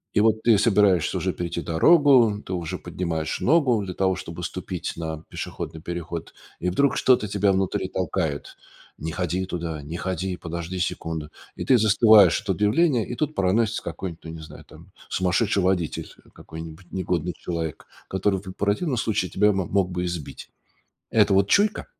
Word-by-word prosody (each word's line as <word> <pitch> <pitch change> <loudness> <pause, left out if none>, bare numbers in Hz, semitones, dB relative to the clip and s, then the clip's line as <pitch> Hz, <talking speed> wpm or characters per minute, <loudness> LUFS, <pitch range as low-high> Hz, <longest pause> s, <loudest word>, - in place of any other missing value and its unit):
и 105 - +5
вот 110 0 +3
ты 115 -3 +5
собираешься 100 -5 +3
уже - - -1
перейти 85 0 -4
дорогу, 120 - +4
ты 95 - -5
уже 90 +1 -3
поднимаешь 85 -2 -3
ногу 130 -8 +3
для 90 -1 -5
того, 95 0 +1
чтобы 85 +1 -7
ступить 90 -1 -4
на 80 -1 -5
пешеходный 80 - -6
переход, 85 -1 -6 0.3
и 90 - 0
вдруг 140 +10 +2
что-то 125 -5 +3
тебя 100 0 +2
внутри 95 -1 -1
толкает: 70 -2 -2 0.4
"Не 80 +2 -4
ходи 90 +2 -2
туда, 85 -4 -4
не 80 +4 -6
ходи, 95 0 -3
подожди 85 +2 -5
секунду." 80 -4 -3 0.3
И - - -4
ты 130 - +5
застываешь 110 -4 +6
от - - -12
удивления 120 +4 +2
и - - -6
тут 155 +2 -2
проносится 105 +4 +1
какой-нибудь, 85 0 -6
ну, 80 - -8
не 80 - -8
знаю, 75 - -11
там, 85 +5 -17 0.2
сумасшедший 95 +2 +1
водитель 90 -3 0 0.3
какой-нибудь, 80 +2 -10
негодный 90 -2 -1
человек, 80 -3 -4 0.2
который 95 0 0
в 95 -2 -8
противном 105 - 0
случае 105 -5 0
тебя 105 +6 +3
мо 95 -3 -1
мог 95 -1 0
бы 90 0 -2
и - - -1
сбить. 85 -4 -6 0.6
Это - - +4
вот 100 +1 +3
чуйка? 205 - +2
95 Hz, 170 wpm, -24 LUFS, 85-105 Hz, 0.6 s, застываешь